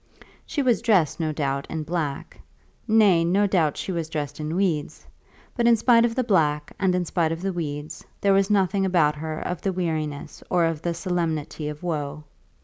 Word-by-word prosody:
She 285 - -1
was 245 -4 +2
dressed, 195 - +2
no 160 -2 0
doubt, 140 -2 -2
in 160 -1 -3
black; 150 -3 -4 0.5
nay, 210 -6 +5
no 190 +5 +2
doubt, 170 -7 +1
she - - -4
was 165 -3 -3
dressed 150 -2 -4
in 155 +2 -3
weeds; 175 -6 -1 0.5
but 235 -1 +2
in 235 - +6
spite 230 +1 +4
of 230 -1 -1
the 255 - +1
black 150 -9 +1
and 190 -2 +2
in 180 -1 0
spite 165 -1 0
of 165 +2 -4
the 195 -1 -1
weeds 150 -3 -5 0.2
there 200 -1 +3
was 195 +1 +3
nothing 195 -1 +2
about 170 -6 +3
her 155 0 -4
of 180 - -4
the 195 - 0
weariness 155 -5 -3
or 175 -2 +3
of 165 -2 -2
the 170 0 -2
solemnity 165 -4 -2
of 150 +2 -8
woe. 150 -3 -3
170 Hz, 195 wpm, -24 LUFS, 155-195 Hz, 0.5 s, in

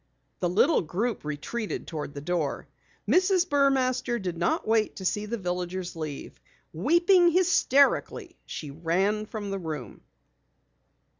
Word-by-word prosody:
The 175 - 0
little 255 - +3
group 210 +8 -2
retreated 150 +10 -4
toward 150 -3 -6
the 140 - -5
door. 160 -2 -2 0.4
Mrs. 370 -1 +3
Burmaster 260 -4 +2
did 180 -4 -4
not 170 +5 -1
wait 220 -1 +2
to 190 - -7
see 210 +3 -1
the 235 +2 -3
villagers 180 -1 -4
leave. 155 -3 -7 0.3
Weeping 345 - +4
hysterically, 350 - +2
she 150 -3 -6
ran 190 +8 0
from 205 -2 -5
the 195 - -2
room. 150 - -6
205 Hz, 130 wpm, -27 LUFS, 170-270 Hz, 0.4 s, Weeping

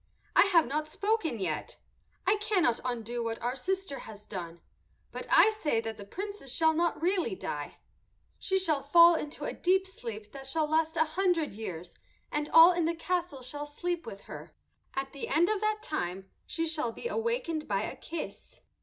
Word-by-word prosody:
"I - - +8
have 340 -5 +5
not 305 +4 -2
spoken 400 - 0
yet. 190 - -3 0.5
I 430 - +4
cannot 390 - +2
undo 240 -1 -3
what 230 0 -3
our 245 +2 -2
sister 370 +1 -2
has 210 -1 -10
done, 170 -5 -6 0.5
but - - -6
I 440 - +7
say 315 - 0
that 225 -1 -4
the 200 - -9
Princess 400 - -6
shall 320 +3 +3
not 340 +1 +1
really 345 - +1
die. 145 -4 -5 0.6
She 380 - +1
shall 315 -7 +1
fall 335 +5 +7
into 300 -2 -4
a - - -2
deep 375 +1 +2
sleep 225 - -7
that 270 -1 -9
shall 310 +3 +1
last 320 +2 +1
a 320 - +4
hundred 335 - +1
years, 180 -5 -7 0.4
and 300 0 -1
all 330 +2 +9
in 345 -2 +1
the 335 +1 0
castle 345 -5 -2
shall 290 +4 -6
sleep 345 +2 -3
with 200 -3 -7
her. - - -10 0.4
At 270 0 -3
the 280 - -5
end 335 +5 +3
of 430 -2 0
that 430 0 0
time 190 - -3 0.2
she 330 - -1
shall 310 -7 -1
be 470 - -5
awakened 450 -10 -1
by 200 0 0
a - - -4
kiss." 330 0 -7
310 Hz, 185 wpm, -30 LUFS, 235-355 Hz, 0.6 s, all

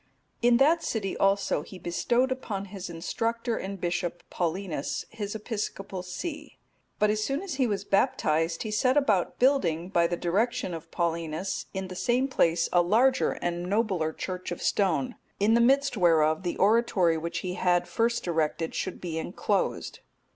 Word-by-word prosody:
In 240 0 +5
that 315 +6 +4
city 205 -9 -2
also 195 -5 +2
he 185 +5 -11
bestowed 240 +9 0
upon 210 -6 -3
his 190 -2 -6
instructor 230 +8 -2
and 195 -1 -5
bishop, 175 0 -2
Paulinus, 175 -3 -2
his 210 -1 -5
episcopal 205 -3 -4
see. 295 - -6 0.4
But 210 0 +3
as 215 0 0
soon 275 - -1
as 385 -5 -4
he 255 - +4
was 200 -3 -2
baptized, 165 - +1
he 215 - -4
set 255 +6 +2
about 215 -11 +2
building, 190 - +2
by 170 -3 +3
the 175 - -2
direction 200 +4 0
of 165 0 -7
Paulinus, 170 +1 -2
in 190 -1 -4
the 185 - -8
same 245 +7 +1
place 170 -10 +2
a 175 - +6
larger 235 +9 +3
and 175 +1 -2
nobler 195 -7 +1
church 185 +3 -5
of 175 - -4
stone, 165 -10 0 0.2
in 210 +3 +3
the 235 - +5
midst 275 +2 +3
whereof 160 -4 +3
the 175 -2 -3
oratory 200 -5 +3
which 170 +1 -3
he 180 - -2
had 175 -1 +1
first 230 +5 0
erected 160 -1 -1
should 185 - -4
be 165 -3 -3
enclosed. 195 +4 -2
195 Hz, 165 wpm, -27 LUFS, 170-230 Hz, 0.4 s, a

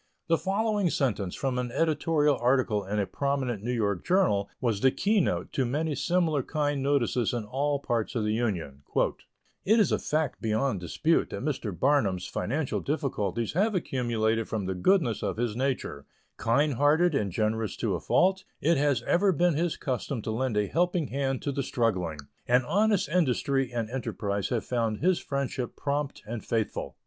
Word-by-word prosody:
The 165 - +4
following 205 -1 +1
sentence 110 - -1
from 130 -2 -1
an 125 -1 -3
editorial 150 -1 +2
article 120 -4 +2
in 100 +2 -3
a 100 - +1
prominent 135 -4 -2
New 120 +3 -2
York 100 -6 0
journal 175 - +2
was 115 -5 0
the 135 - +6
key 210 +10 +1
note - - -2
to 135 - +1
many 150 +5 -1
similar 160 0 +1
kind 145 0 -1
notices 125 -4 +1
in 120 - -2
all 140 +6 -1
parts 120 -3 -2
of 115 - 0
the 105 0 0
Union: 90 - -2 0.8
"It 220 +4 +4
is 205 - +3
a - - +2
fact 155 -2 -1
beyond 110 0 0
dispute 155 - +1
that - - -5
Mr. 135 -7 -2
Barnum's 105 -10 +2
financial 140 +4 -2
difficulties 115 - -2
have 205 +5 +2
accumulated 115 - 0
from 105 -3 -2
the 95 - -1
goodness 120 - +2
of - - -2
his 115 -2 -1
nature; 125 - -2 0.3
kind 130 +7 +2
hearted 150 +6 +3
and 105 -8 0
generous 110 +2 -1
to - - -1
a - - -1
fault, 190 +1 +2 0.2
it 165 +1 +2
has 140 -4 +1
ever 190 +8 +3
been 175 +1 +2
his 165 +2 0
custom 130 -2 -3
to 110 - -2
lend 120 -1 -1
a 105 - +2
helping 175 - 0
hand 135 -1 -1
to 140 - -1
the 140 0 -2
struggling; 95 - -1 0.3
and 125 +1 +3
honest 205 - +2
industry 135 -5 +1
and 115 -2 -2
enterprise 100 -6 -2
have 115 -3 -1
found 115 -3 0
his 180 - +2
friendship 135 -3 -3
prompt 145 0 -2
and 110 0 -5
faithful." 115 -2 -2
130 Hz, 175 wpm, -28 LUFS, 110-155 Hz, 0.8 s, the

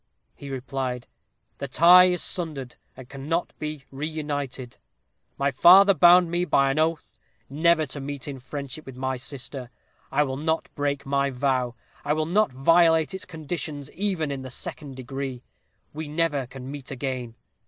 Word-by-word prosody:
he 140 - -10
replied, 130 -1 -4 0.5
'The 140 - -4
tie 175 +7 +7
is 180 -1 +1
sundered, 150 -8 -3 0.2
and 130 -2 -11
cannot 145 +6 -3
be 150 -2 -5
reunited; 145 -4 -4 0.6
my 140 0 +1
father 190 +8 +7
bound 175 +1 +6
me 175 +1 +1
by 140 -6 +3
an 145 - -1
oath 155 -8 -1 0.3
never 160 +2 +3
to 140 +1 -7
meet 140 0 -6
in 140 -2 -6
friendship 140 +2 -7
with 135 - -10
my 130 +1 -2
sister; 130 -1 -5 0.4
I 150 - +3
will 135 -2 -3
not 160 +2 -1
break 140 -1 -2
my 140 0 +1
vow, 130 -2 -1 0.3
I 150 - +1
will 155 0 0
not 195 +1 +2
violate 160 +5 +4
its 190 - -6
conditions, 155 -3 -5
even 185 -6 -1
in 135 -1 -4
the 130 - -7
second 135 +2 -6
degree. 130 -1 -6 0.5
We 155 +1 -5
never 150 -4 -1
can 130 +1 -9
meet 140 -3 -8
again. 130 -3 -4
140 Hz, 160 wpm, -25 LUFS, 130-160 Hz, 0.6 s, tie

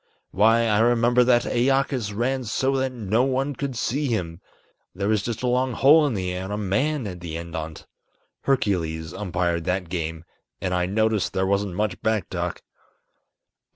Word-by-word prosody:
Why, 110 +4 +4
I 105 -2 +2
remember 120 +1 +4
that 120 -1 +4
Æacus 130 -2 +1
ran 130 +3 0
so 130 +5 0
that 130 0 0
no 110 -2 0
one 135 +2 0
could 135 0 -4
see 140 +5 -1
him, 90 -8 -3 0.5
There 100 +1 -2
was 110 -2 +2
just 115 +3 -4
a - - +1
long 125 +1 +1
hole 150 +6 +6
in 125 - -2
the 90 -2 -2
air 90 +1 -4
and 95 - -6
a - - -2
man 115 +8 0
at 90 -3 -6
the 85 -2 -5
end 85 0 -7
on't. 80 -1 -6 0.6
Hercules 85 -11 0
umpired 90 -4 -1
that 90 -1 -1
game, 80 -2 -4 0.3
and 90 -1 -2
I 90 0 +1
noticed 110 +1 +1
there 95 - +1
wasn't 100 -1 0
much 105 -2 -2
back 110 -5 0
talk." - - -3
105 Hz, 180 wpm, -24 LUFS, 90-125 Hz, 0.6 s, hole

